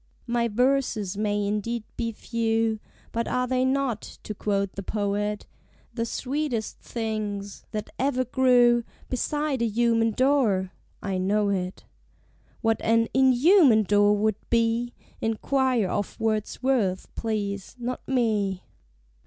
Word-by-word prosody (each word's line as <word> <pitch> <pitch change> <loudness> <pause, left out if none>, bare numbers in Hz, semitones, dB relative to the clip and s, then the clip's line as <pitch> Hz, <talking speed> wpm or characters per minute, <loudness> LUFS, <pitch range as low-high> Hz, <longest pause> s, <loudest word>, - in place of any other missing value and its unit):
My 235 -1 +1
verses 235 -4 +1
may 205 0 0
indeed 210 +3 -2
be 230 -1 -2
few, 225 -1 0 0.3
But 230 0 -2
are 250 0 0
they 255 0 +1
not, 260 -4 0 0.2
to 215 - -5
quote 200 -1 -1
the 195 - -5
poet, 205 +1 -2 0.5
"The 230 0 -2
sweetest 260 -4 -2
things 210 -3 -4
that 210 -1 -5
ever 255 -1 +1
grew 245 -1 +4 0.3
Beside 295 +1 -1
a 235 - +2
human 230 +1 +2
door"? 225 -7 +2 0.3
I 195 -2 -1
know 205 +2 +1
it. 185 -2 -3 0.8
(What 225 -1 +1
an 230 0 +3
_in_human 265 - +5
door 205 +1 +4
would 215 0 +1
be, 235 +1 +1 0.3
Enquire 245 0 +1
of 205 -1 -3
Wordsworth, 220 -2 0
please, 200 -3 -3
not 245 +1 -4
me.) 215 -7 0
225 Hz, 120 wpm, -26 LUFS, 205-250 Hz, 0.8 s, in_human